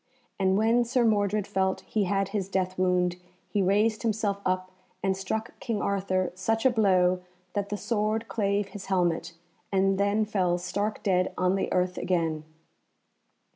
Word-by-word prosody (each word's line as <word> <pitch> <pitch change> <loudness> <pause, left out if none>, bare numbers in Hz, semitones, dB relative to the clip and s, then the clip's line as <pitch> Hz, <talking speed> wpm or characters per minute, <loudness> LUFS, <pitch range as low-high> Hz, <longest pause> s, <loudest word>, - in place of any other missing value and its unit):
And 190 0 +3
when 225 +3 +3
Sir 240 0 +1
Mordred 205 -2 +2
felt 190 -1 0
he 210 -2 -1
had 195 +1 0
his 195 -2 -2
death 185 -1 -1
wound, 180 -1 +1 0.3
he 205 - 0
raised 210 +3 +2
himself 215 -3 -1
up 185 0 -1 0.3
and 190 -1 +2
struck 215 +4 -4
King 230 -4 -2
Arthur 190 -2 0
such 225 +6 -1
a 260 - +6
blow 185 -5 +3 0.3
that 200 -1 -2
the 205 - -2
sword 220 +2 -1
clave 200 -2 0
his 195 -2 -9
helmet, 175 -3 0 0.4
and 195 0 +2
then 205 +2 +2
fell 185 -4 +1
stark 200 +4 -3
dead 185 -2 +2
on 180 0 +2
the 195 - -1
earth 180 0 0
again. 165 -4 -1
195 Hz, 160 wpm, -27 LUFS, 185-210 Hz, 0.4 s, a